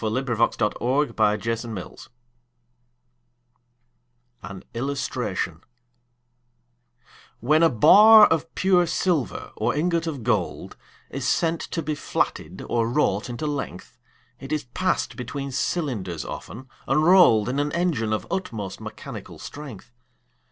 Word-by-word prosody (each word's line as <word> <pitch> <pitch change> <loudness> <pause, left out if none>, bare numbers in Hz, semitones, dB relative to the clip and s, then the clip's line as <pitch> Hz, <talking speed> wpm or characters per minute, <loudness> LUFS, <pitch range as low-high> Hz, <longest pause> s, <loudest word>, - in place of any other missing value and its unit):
William 115 +5 -1
Cowper 115 -3 +1
The 135 +5 0 0.2
Flatting 115 +1 -3
Mill 95 - -8 2.5
An 95 +1 -9
Illustration 135 +4 -3 1.8
WHEN 150 +7 +3
a 165 - +6
bar 210 - +8
of 160 -1 0
pure 180 -2 +3
silver 170 -5 -1
or - - -1
ingot 170 +2 0
of 140 -7 -4
gold 105 -7 -2 0.4
Is 135 -1 -3
sent 165 +3 +1
to 165 - -4
be 155 +1 -2
flatted 145 - -3
or 115 -1 0
wrought 120 -4 0
into 120 +6 -5
length, 145 -1 -5 0.4
It 135 +1 -9
is 155 -1 -1
pass'd 185 +10 -2
between 135 +2 -5
cylinders 120 - -2
often, 130 +4 -8 0.2
and 155 - +2
roll'd 170 - +6
In 130 +3 -1
an 145 +1 -1
engine 160 -11 0
of 110 - -1
utmost 110 - -4
mechanical - - -9
strength. 130 -6 -10
135 Hz, 120 wpm, -24 LUFS, 115-165 Hz, 2.5 s, bar